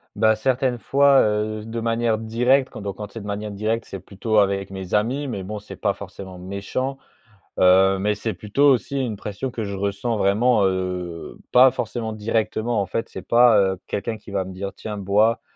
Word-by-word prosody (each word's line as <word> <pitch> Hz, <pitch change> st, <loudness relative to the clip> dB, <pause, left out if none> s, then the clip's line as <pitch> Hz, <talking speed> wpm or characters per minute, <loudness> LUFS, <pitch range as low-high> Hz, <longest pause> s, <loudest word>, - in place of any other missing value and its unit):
Bah, 110 Hz, +1 st, +3 dB
certaines 125 Hz, +1 st, 0 dB
fois, 140 Hz, +4 st, +4 dB
heu, 105 Hz, 0 st, -1 dB
de 115 Hz, +1 st, -4 dB
manière 115 Hz, -1 st, +1 dB
directe 125 Hz, +5 st, +2 dB
quand -, -, -9 dB
donc, 100 Hz, -2 st, -4 dB
quand 105 Hz, -1 st, -8 dB
c'est 115 Hz, -, -7 dB
de 105 Hz, -, -10 dB
manière 105 Hz, +1 st, -4 dB
directe 110 Hz, +3 st, -1 dB
c'est 95 Hz, -, -7 dB
plutôt 105 Hz, +4 st, -2 dB
avec 100 Hz, -1 st, +2 dB
mes 95 Hz, -2 st, -7 dB
amis. 125 Hz, +7 st, +1 dB
Mais 100 Hz, -6 st, -4 dB
bon 105 Hz, +2 st, -5 dB
c'est 105 Hz, -, -11 dB
pas 100 Hz, -2 st, 0 dB
forcément 95 Hz, -1 st, -10 dB
méchant. 100 Hz, +9 st, -4 dB, 0.6 s
Heu, 95 Hz, +1 st, +5 dB
mais 105 Hz, +1 st, +1 dB
c'est 110 Hz, 0 st, -3 dB
plutôt 125 Hz, +10 st, +2 dB
aussi 135 Hz, +2 st, +1 dB
une 120 Hz, -6 st, -2 dB
pression 105 Hz, +7 st, -5 dB
que 110 Hz, -3 st, -4 dB
je 100 Hz, 0 st, -4 dB
ressens 100 Hz, +4 st, -2 dB
vraiment, 105 Hz, +2 st, +3 dB
heu, 90 Hz, -3 st, -3 dB
pas 130 Hz, +1 st, +8 dB
forcément 115 Hz, -3 st, -4 dB
directement 110 Hz, +1 st, -1 dB
en -, -, -1 dB
fait, 115 Hz, +5 st, -3 dB
c'est -, -, -8 dB
pas, 120 Hz, -3 st, +6 dB
heu, 95 Hz, -1 st, +1 dB
quelqu'un 110 Hz, +2 st, -3 dB
qui 105 Hz, 0 st, -13 dB
va 95 Hz, -2 st, -1 dB
me 95 Hz, -, -8 dB
dire: 100 Hz, +1 st, -5 dB
«Tiens 105 Hz, -1 st, -6 dB
bois». 105 Hz, +4 st, +2 dB
105 Hz, 200 wpm, -22 LUFS, 100-115 Hz, 0.6 s, pas